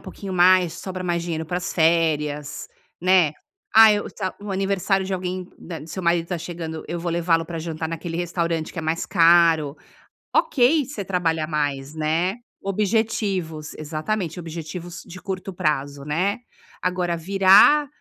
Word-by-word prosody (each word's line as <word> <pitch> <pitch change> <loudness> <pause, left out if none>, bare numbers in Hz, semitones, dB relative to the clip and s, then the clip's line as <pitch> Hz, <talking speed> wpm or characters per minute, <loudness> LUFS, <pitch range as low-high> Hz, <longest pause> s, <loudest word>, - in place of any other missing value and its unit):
pouquinho 195 -2 -7
mais, 180 -1 +5
sobra 185 -1 -6
mais 175 -1 -1
dinheiro 160 -2 -3
para 175 - -2
as 180 - -3
férias", 150 -3 +1 0.3
né. 180 -4 +4 0.4
"Ah, 225 0 +9
eu 205 0 -2
tá 190 -3 -4
o 205 0 -7
aniversário 195 0 0
de 190 - -2
alguém 185 0 -4
da 165 -2 -7
do 155 - -11
seu 185 +3 -5
marido 170 -1 +1
tá 180 - -2
chegando, 165 -1 -6
eu 170 0 -4
vou 170 0 -2
levá-lo 165 -1 +1
para 165 0 -5
jantar 160 0 -4
naquele 165 +1 -5
restaurante 170 -2 -2
que - - -6
é - - -2
mais 160 +2 -1
caro." 165 -4 +4 0.6
Ok, 275 +2 +3
você 235 -6 -6
trabalhar 165 -4 0
mais, 145 -2 -2
né. 160 +5 0 0.3
Objetivos 195 -6 -1
exatamente, 165 +4 -3
objetivos 170 +1 -7
de 180 - -9
curto 190 0 -5
prazo, 145 -4 -1
né. 180 +9 0 0.5
Agora 180 -1 0
virar 195 - +6
175 Hz, 155 wpm, -23 LUFS, 160-190 Hz, 0.6 s, Ah